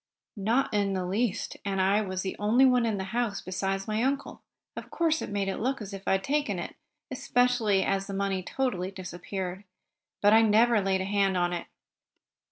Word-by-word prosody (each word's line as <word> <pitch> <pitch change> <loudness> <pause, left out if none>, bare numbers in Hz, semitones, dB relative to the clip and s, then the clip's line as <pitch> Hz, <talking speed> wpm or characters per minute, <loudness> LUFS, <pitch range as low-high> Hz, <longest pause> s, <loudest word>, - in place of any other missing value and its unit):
"Not 225 +6 0
in 200 -1 +1
the 185 -1 -2
least. 210 +3 -1
And 195 -1 -2
as - - +3
I 200 +2 +3
was 185 -2 -3
the 190 - -3
only 225 +6 +4
one 250 -2 +4
in 215 -2 -1
the 190 - -3
house, 235 -4 0
besides 195 +1 -3
my 215 +1 0
uncle, 275 +2 -2 0.3
of - - -8
course 325 -2 +1
it - - -5
made 200 -1 -1
it 195 - -2
look 265 +4 -1
as 205 -2 -7
if 195 0 -9
I - - +3
had 195 0 0
taken 290 +4 0
it, - - -6 0.4
especially 245 -6 +2
as 195 0 -1
the 200 - -5
money 195 -1 -1
totally 190 -4 -2
disappeared. 185 0 -6 0.6
But 205 +1 +5
I 225 - +7
never 225 +1 +4
laid 190 -1 0
a - - -2
hand 195 -1 +1
on 175 0 +1
it." 175 - -4
200 Hz, 205 wpm, -28 LUFS, 190-235 Hz, 0.6 s, I